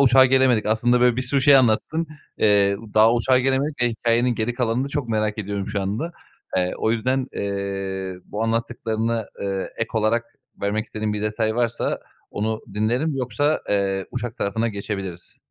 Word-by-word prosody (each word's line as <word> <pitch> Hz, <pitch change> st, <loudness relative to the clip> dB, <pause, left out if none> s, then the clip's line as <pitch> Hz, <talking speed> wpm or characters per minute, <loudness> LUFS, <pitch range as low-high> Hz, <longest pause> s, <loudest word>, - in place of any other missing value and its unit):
uçağa 130 Hz, -1 st, +7 dB
gelemedik. 130 Hz, -4 st, +3 dB
Aslında 120 Hz, +3 st, +2 dB
böyle 125 Hz, -1 st, +4 dB
bir 130 Hz, -, 0 dB
sürü 135 Hz, +2 st, +1 dB
şey 140 Hz, 0 st, +8 dB
anlattın, 135 Hz, +7 st, +2 dB, 0.3 s
eee, 100 Hz, -2 st, +4 dB, 0.2 s
daha 110 Hz, +2 st, +6 dB
uçağa 125 Hz, +2 st, +3 dB
gelemedik 135 Hz, +1 st, 0 dB
ve 120 Hz, -, +4 dB
hikâyenin 120 Hz, +1 st, +1 dB
geri 115 Hz, +2 st, -1 dB
kalanını 125 Hz, +2 st, 0 dB
çok 145 Hz, -3 st, -3 dB
merak 110 Hz, -1 st, 0 dB
ediyorum 100 Hz, -1 st, -3 dB
şu 105 Hz, -1 st, -2 dB
anda. 110 Hz, -, -3 dB, 0.4 s
Eee, 90 Hz, 0 st, +1 dB
o 110 Hz, -, +1 dB
yüzden, 130 Hz, +3 st, 0 dB
eee, 95 Hz, -1 st, -3 dB
bu 105 Hz, -, -4 dB
anlattıklarına, 115 Hz, -1 st, -1 dB
eee, 95 Hz, -1 st, -2 dB
ek 115 Hz, -, -1 dB
olarak 110 Hz, +1 st, +2 dB, 0.4 s
vermek 105 Hz, +2 st, 0 dB
istediğin 110 Hz, -1 st, -3 dB
bir 105 Hz, -, -3 dB
detay 110 Hz, +1 st, 0 dB
varsa, 120 Hz, -1 st, 0 dB, 0.3 s
onu 110 Hz, +1 st, -2 dB
dinlerim. 120 Hz, +9 st, 0 dB
Yoksa, 135 Hz, +4 st, 0 dB
eee, 95 Hz, -1 st, 0 dB
uçak 120 Hz, -2 st, -4 dB
tarafına 110 Hz, +3 st, 0 dB
geçebiliriz. 100 Hz, -4 st, -6 dB
115 Hz, 165 wpm, -23 LUFS, 105-125 Hz, 0.4 s, şey